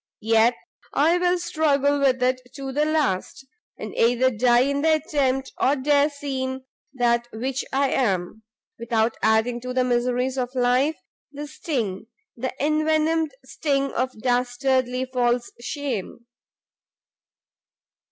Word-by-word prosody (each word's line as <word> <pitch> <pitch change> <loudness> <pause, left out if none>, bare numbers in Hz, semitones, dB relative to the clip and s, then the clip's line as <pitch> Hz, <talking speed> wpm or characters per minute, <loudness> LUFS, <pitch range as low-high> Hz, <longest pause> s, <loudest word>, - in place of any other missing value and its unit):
yet 225 +2 +4 0.4
I 330 +5 +3
will 360 0 +2
struggle 290 -4 +1
with 260 -2 +2
it 255 0 +1
to 270 -1 -5
the 295 +3 +1
last, 290 -6 -1 0.3
and - - -7
either 245 +2 +3
die 240 +1 +3
in 280 +2 0
the 315 +1 +4
attempt, 270 -3 -1
or 275 - +3
dare 285 +1 +3
seem 265 -2 -4 0.3
that 240 -1 +1
which 255 +4 -3
I 275 0 +1
am, 195 -4 -1 0.4
without 230 -1 0
adding 220 +2 +2
to 250 +1 -5
the 255 - +3
miseries 250 +1 0
of 250 +1 -3
life, 255 +5 +2 0.3
the 290 +1 -6
sting, 235 - -4 0.3
the 255 +2 -3
envenomed 310 +1 +1
sting 275 0 -1
of 255 +1 0
dastardly 255 +1 +1
false 245 -2 0
shame!" 245 - -4
260 Hz, 125 wpm, -23 LUFS, 245-285 Hz, 0.4 s, yet